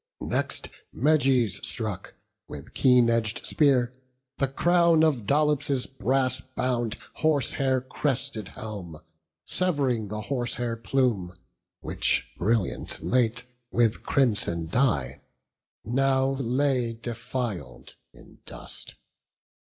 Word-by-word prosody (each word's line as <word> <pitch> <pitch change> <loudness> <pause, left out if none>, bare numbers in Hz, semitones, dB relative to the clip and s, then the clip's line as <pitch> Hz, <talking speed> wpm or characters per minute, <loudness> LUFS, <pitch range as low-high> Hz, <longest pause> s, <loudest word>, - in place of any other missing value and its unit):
Next - - -2 0.2
Meges 130 - +2
struck, - - -5 0.3
with - - -9
keen 125 -2 +5
edg'd 115 -2 0
spear, 130 -5 +3 0.5
the 135 - +2
crown 170 +3 +4
Of 130 -10 +1
Dolops' 145 -2 +2
brass 130 0 0
bound, 120 -3 0 0.2
horsehair 135 -3 +1
crested 130 -3 -2
helm, 95 -8 -8 0.5
Sev'ring 140 - 0
the 105 +2 -4
horsehair 120 -1 -2
plume, 115 -6 0 0.5
which, - - 0
brilliant 110 0 -1
late 120 -1 +1 0.3
With 115 -1 +2
crimson 105 - +1
dye, 75 - 0 0.6
now 135 +3 +2
lay 130 -2 0
defil'd 115 - -5 0.2
in - - -17
dust. - - -10
125 Hz, 95 wpm, -27 LUFS, 110-135 Hz, 0.6 s, keen